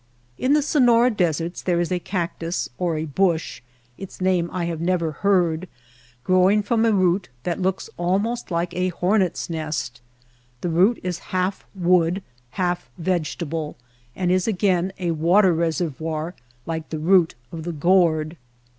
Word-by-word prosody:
In 265 +3 +2
the 300 -1 +3
Sonora 245 -4 +4
deserts 170 -4 -1
there 175 -2 +1
is 175 +1 -1
a 180 - +1
cactus 170 -2 -3
or 170 -3 0
a 155 - -2
bush 165 +2 0 0.4
(its 195 - -9
name 185 -2 +1
I 180 -2 -2
have 165 -2 -3
never 170 -2 0
heard) 180 -1 +1 0.5
growing 185 +5 +4
from 225 +2 +1
a - - +4
root 185 -2 +2
that 175 +2 -2
looks 190 0 -1
almost 200 +7 -1
like 170 0 -1
a 180 +1 0
horneVs 185 +1 0
nest. 150 -6 -4 0.6
This 175 - -1
root 190 +8 +3
is 180 -2 -3
half 185 +1 -1
wood, 180 0 +2 0.3
half 175 -1 -1
vegetable, 165 -3 -2 0.4
and 180 -1 0
is 185 +2 +2
again 185 -3 +1
a 175 -2 -1
water 175 +4 +4
reservoir 160 0 -2 0.3
like 160 -1 -4
the 160 - -3
root 170 +1 +3 0.2
of 165 - -6
the 175 +2 -4
gourd. 165 -1 +2
175 Hz, 150 wpm, -23 LUFS, 165-190 Hz, 0.6 s, Sonora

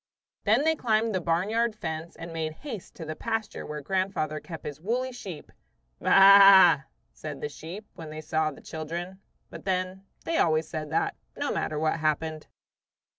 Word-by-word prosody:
Then 220 +7 +4
they 320 +1 +3
climbed 225 -4 +1
the 185 - 0
barnyard 210 +8 +1
fence 160 -3 -5
and 165 0 -8
made 160 -1 -3
haste 225 -10 -7
to 165 - -7
the 155 0 -5
pasture 225 +1 -3
where 150 0 -5
grandfather 185 -2 -1
kept 165 -2 -9
his 150 +1 -6
woolly 250 +7 -1
sheep. 195 -10 -9 0.5
"Baa 195 -3 +8
a!" 140 - -19 0.3
said 150 -3 -7
the 150 - -4
sheep 175 +8 -9
when 165 -3 -9
they 155 0 -7
saw 155 0 0
the 140 - -11
children; 170 +4 -6 0.3
but - - -9
then, 185 0 -2 0.2
they 330 0 0
always 155 -1 +2
said 155 -2 -5
that, 160 - 0 0.2
no - - -1
matter 155 - -2
what 155 +1 0
happened. 155 0 -1
170 Hz, 175 wpm, -27 LUFS, 155-200 Hz, 0.5 s, Baa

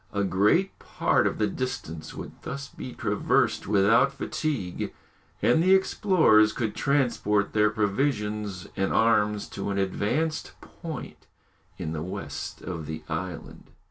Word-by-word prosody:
A 100 -1 0
great 105 - +2
part - - +1
of - - -2
the 105 - +2
distance 105 - -4
would - - -7
thus 140 +1 -5
be 130 - -8
traversed 105 -2 +1
without 105 +7 +4
fatigue, 140 - -3 0.5
and 160 - +4
the 185 +2 +6
explorers 160 - +4
could 110 -3 -2
transport 120 -8 +1
their 105 0 +4
provisions 105 -3 -1
and 95 -1 0
arms 105 -2 +2
to 100 - -4
an 100 - -1
advanced 120 - -1
point 160 -5 -9 0.5
in 80 - -4
the 80 - -3
west 85 -5 -6
of 85 -5 -5
the 80 0 -6
island. 85 +1 -6
105 Hz, 135 wpm, -27 LUFS, 95-135 Hz, 0.5 s, the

